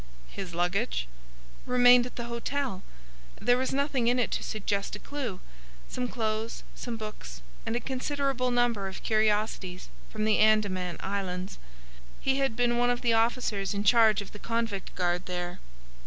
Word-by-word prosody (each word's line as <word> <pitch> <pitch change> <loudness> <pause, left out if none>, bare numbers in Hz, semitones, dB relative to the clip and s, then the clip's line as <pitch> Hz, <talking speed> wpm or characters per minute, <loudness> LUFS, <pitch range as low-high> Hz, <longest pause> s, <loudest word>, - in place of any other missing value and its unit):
"His 185 -4 -6
luggage?" 180 - 0 0.6
"Remained 245 0 +6
at - - -13
the 240 - -4
hotel. 235 -2 -2 0.6
There 245 0 +3
was 260 - 0
nothing 275 -3 +1
in 245 +1 +4
it 245 - +1
to - - -1
suggest 205 -2 -2
a - - -5
clue,—some 180 - -6
clothes, 220 -2 -2
some 240 -2 -5
books, 65 - -8 0.2
and 225 - 0
a - - +1
considerable 265 0 -1
number 240 -5 +1
of 190 - -8
curiosities 210 -4 0 0.2
from 215 -1 -2
the 215 -1 +3
Andaman 200 -5 +3
Islands. 190 -1 -3 0.6
He 270 0 +1
had 270 -5 +1
been 240 0 +2
one 245 0 +3
of 245 0 0
the 235 -2 +2
officers 225 -4 +1
in 200 - -1
charge 220 -2 +5
of 195 - -13
the 210 - -10
convict 230 -4 -2
guard 175 -1 0
there." 175 -1 -4
220 Hz, 155 wpm, -29 LUFS, 195-245 Hz, 0.6 s, Remained